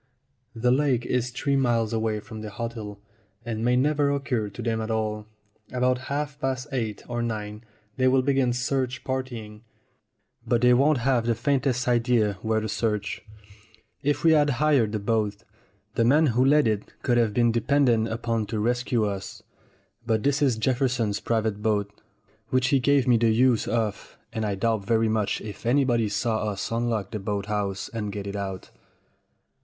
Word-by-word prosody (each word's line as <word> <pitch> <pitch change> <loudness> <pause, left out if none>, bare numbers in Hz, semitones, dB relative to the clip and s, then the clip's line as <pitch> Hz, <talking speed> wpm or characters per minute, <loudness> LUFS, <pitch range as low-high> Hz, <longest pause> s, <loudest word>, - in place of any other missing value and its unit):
The 125 +2 +2
lake 130 -3 +2
is 125 -1 0
three 140 +3 -1
miles 120 -4 +1
away 110 -1 0
from 110 -2 -9
the 110 - -6
hotel, 110 -2 -6 0.5
and 115 -1 -3
may 125 +1 +3
never 145 +2 +2
occur 135 -7 -1
to 100 +4 -9
them 115 -1 -1
at 110 - -4
all. 110 -1 -2 0.4
About 125 0 +1
half 145 0 -3
past 130 -2 -2
eight 110 -6 -3
or 120 -1 -2
nine 105 -2 -4 0.3
they 130 0 +3
will 130 0 +3
begin 135 -2 +2
search 125 0 -1
partying, 120 -5 -5 0.8
but 120 -1 +1
they 125 0 +6
won't 140 +4 +4
have 120 -1 +1
the 115 - +2
faintest 130 +1 0
idea 115 -5 +2
where 110 0 +1
to 110 - -3
search. 105 -1 -2 0.8
If 145 +3 0
we 165 - +6
had 150 -2 +4
hired 140 -7 +3
the 110 - -1
boat, 105 0 -1 0.5
the 115 - +2
man 145 +7 +4
who 125 +3 +3
let 145 +2 +4
it 105 -2 -1
could 120 -1 +2
have 115 -2 +2
been 120 -1 +3
depended 120 -1 +2
upon 115 -1 -2
to 110 - -3
rescue 120 +1 0
us. 100 -2 -5 0.6
But 110 -2 0
this 140 +2 +1
is 130 -6 +2
Jefferson's 120 -3 0
private 110 -2 -1
boat, 105 -1 0 0.6
which 130 0 +2
he 140 - +3
gave 140 0 +2
me 120 -2 +5
the 115 0 +3
use 120 +1 +3
of, 110 -3 -2 0.2
and 110 -1 -2
I 100 - -1
doubt 110 +1 0
very 115 +1 +2
much 110 -2 0
if 105 -1 -8
anybody 120 -3 +2
saw 110 0 -1
us 100 +1 -4
unlock 115 -4 -1
the 110 - -3
boat 100 0 -3
house 100 -2 -2
and 105 -3 -4
get 100 -1 -5
it 100 0 -5
out. 95 -2 -5
115 Hz, 175 wpm, -25 LUFS, 110-130 Hz, 0.8 s, they